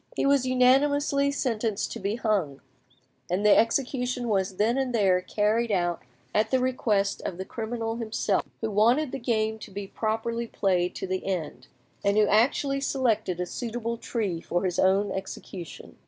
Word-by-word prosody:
He -, -, 0 dB
was 275 Hz, -2 st, +3 dB
unanimously 280 Hz, +3 st, +3 dB
sentenced 230 Hz, -7 st, -1 dB
to -, -, -5 dB
be 200 Hz, +2 st, -1 dB
hung, 200 Hz, -, -1 dB, 0.7 s
and 185 Hz, +4 st, 0 dB
the 210 Hz, -, +7 dB
execution 250 Hz, 0 st, +1 dB
was 190 Hz, -2 st, 0 dB
then 220 Hz, +5 st, +2 dB
and 265 Hz, -2 st, -1 dB
there 190 Hz, -4 st, +3 dB
carried 215 Hz, +4 st, 0 dB
out, 175 Hz, -3 st, 0 dB, 0.3 s
at 215 Hz, -, +2 dB
the 260 Hz, -, +2 dB
request 220 Hz, -6 st, 0 dB
of 170 Hz, -, -5 dB
the 190 Hz, -, -5 dB
criminal 225 Hz, +1 st, -4 dB
himself, 220 Hz, -3 st, 0 dB, 0.2 s
who 220 Hz, -1 st, -2 dB
wanted 240 Hz, +8 st, +3 dB
the 270 Hz, -, -4 dB
game 220 Hz, -2 st, 0 dB
to 220 Hz, -, -9 dB
be 200 Hz, +1 st, -6 dB
properly 225 Hz, +3 st, -2 dB
played 180 Hz, -4 st, 0 dB
to -, -, -4 dB
the 185 Hz, 0 st, -3 dB
end, 155 Hz, -9 st, -4 dB, 0.4 s
and 200 Hz, +1 st, +2 dB
who 215 Hz, -, +6 dB
actually 275 Hz, +6 st, +2 dB
selected 230 Hz, -10 st, 0 dB
a 180 Hz, -, -1 dB
suitable 235 Hz, +3 st, -4 dB
tree 200 Hz, -9 st, -3 dB
for 175 Hz, +2 st, -1 dB
his 180 Hz, -1 st, -1 dB
own 195 Hz, +1 st, +3 dB
execution. 190 Hz, -, -7 dB
220 Hz, 170 wpm, -27 LUFS, 195-245 Hz, 0.7 s, the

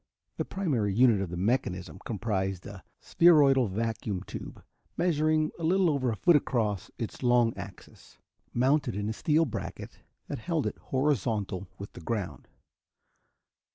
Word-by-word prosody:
The -, -, -1 dB
primary 130 Hz, -, -1 dB
unit 115 Hz, -4 st, +5 dB
of 95 Hz, -, -3 dB
the 85 Hz, -, -5 dB
mechanism 95 Hz, -3 st, -1 dB
comprised 95 Hz, -5 st, -2 dB
a 100 Hz, -3 st, -9 dB, 0.2 s
spheroidal 145 Hz, -7 st, +5 dB
vacuum 105 Hz, -2 st, -3 dB
tube -, -, -8 dB, 0.3 s
measuring 155 Hz, -2 st, +2 dB
a -, -, -6 dB
little 180 Hz, +1 st, +3 dB
over 135 Hz, -3 st, 0 dB
a 115 Hz, -, -1 dB
foot 170 Hz, -, +4 dB
across 110 Hz, -9 st, 0 dB
its 115 Hz, -, -5 dB
long 120 Hz, -2 st, +3 dB
axis, 95 Hz, 0 st, -11 dB, 0.3 s
mounted 130 Hz, -1 st, +1 dB
in 105 Hz, +1 st, -2 dB
a -, -, -1 dB
steel 155 Hz, +7 st, +2 dB
bracket 125 Hz, -, -6 dB, 0.3 s
that -, -, -4 dB
held 165 Hz, +3 st, -1 dB
it -, -, -3 dB
horizontal 110 Hz, -9 st, -1 dB
with 100 Hz, -, -9 dB
the -, -, -10 dB
ground. 105 Hz, +2 st, -4 dB
115 Hz, 145 wpm, -29 LUFS, 100-150 Hz, 0.3 s, unit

